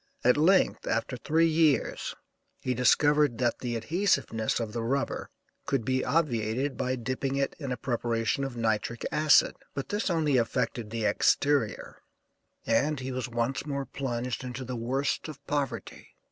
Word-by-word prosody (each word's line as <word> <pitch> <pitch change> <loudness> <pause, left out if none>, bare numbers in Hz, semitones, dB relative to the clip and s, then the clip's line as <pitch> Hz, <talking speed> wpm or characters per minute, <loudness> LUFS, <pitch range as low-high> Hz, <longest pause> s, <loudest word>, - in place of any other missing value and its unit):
At 125 - +5
length, 180 +6 +3
after 115 +3 -1
three 160 +6 +2
years 160 -5 +1 0.4
he 130 - -1
discovered 145 +2 +3
that 120 0 0
the 120 -2 -3
adhesiveness 130 - 0
of 110 -2 -4
the 120 - -2
rubber 135 +4 -2 0.4
could 135 -5 0
be 130 +1 +1
obviated 130 -2 0
by 130 +1 -1
dipping 130 +2 -2
it 140 0 -1
in 140 -4 -4
a 125 - -2
preparation 115 +1 -1
of 135 -3 -4
nitric 115 +1 -1
acid. 150 0 +4 0.2
But 140 - -4
this 205 0 -1
only 155 -6 +2
affected 115 -1 -1
the 115 -1 -2
exterior, 135 +4 +1 0.6
and 150 0 +2
he 130 +1 -4
was 130 0 -3
once 120 +3 -1
more 140 -1 -2
plunged 125 -1 -3
into 125 +1 -5
the 125 0 -4
worst 130 +7 -1
of 145 -3 -10
poverty. 145 -2 -4
130 Hz, 155 wpm, -28 LUFS, 120-145 Hz, 0.6 s, At